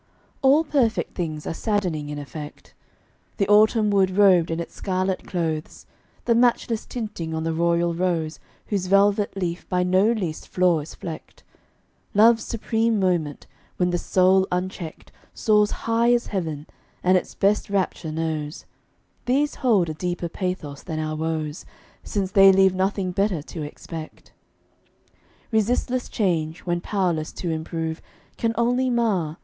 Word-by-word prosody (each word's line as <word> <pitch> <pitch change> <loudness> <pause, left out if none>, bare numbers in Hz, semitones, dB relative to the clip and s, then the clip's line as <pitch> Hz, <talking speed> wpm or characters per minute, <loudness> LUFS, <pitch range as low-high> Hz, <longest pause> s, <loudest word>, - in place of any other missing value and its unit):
All 275 +4 +5
perfect 265 -8 0
things 155 -4 -4
are - - -2
saddening 175 -7 -1
in 150 - -5
effect. 145 +1 -9 0.6
The 200 - +1
autumn 215 +1 +4
wood 190 -1 +2
robed 185 -5 +5
in 165 0 -2
its 170 - -6
scarlet 185 -1 -2
clothes, 160 -4 -3 0.4
The 235 - +3
matchless 235 -1 +1
tinting 205 -9 -5
on 160 - -2
the 165 0 -1
royal 170 +1 +1
rose 165 -3 -1 0.3
Whose 195 -3 -2
velvet 200 +1 +3
leaf 175 -2 -3
by 180 0 +1
no 185 +4 +3
least 180 -9 -3
flaw 180 -3 +2
is 150 - -8
flecked, 165 -3 -9 0.7
Love's 225 +1 +6
supreme 225 -1 0
moment, 175 -6 0 0.3
when 180 -1 +1
the 175 - 0
soul 190 +1 +3
unchecked 180 -2 -4 0.2
Soars 210 -1 +3
high 230 +1 +1
as 240 - -1
heaven, 160 -7 -3 0.4
and 185 +1 +4
its 185 - -1
best 200 +1 +1
rapture 185 -4 -1
knows 155 -1 -3 0.6
These 285 +4 +2
hold 215 -9 +2
a 155 - -3
deeper 175 +1 -3
pathos 170 -7 -4
than 160 -3 -5
our 155 0 -2
woes, 155 -1 -3 0.4
Since 195 -3 -2
they 195 0 +8
leave 190 0 +4
nothing 190 0 -1
better 185 -4 0
to 160 - -8
expect. 155 +2 -9 1.2
Resistless 245 +3 0
change, 165 -5 -1
when 175 -1 -2
powerless 175 -7 -1
to 175 - -3
improve, 160 0 -3 0.3
Can 230 0 -1
only 245 +2 +2
mar. 200 -10 0
185 Hz, 145 wpm, -24 LUFS, 165-210 Hz, 1.2 s, they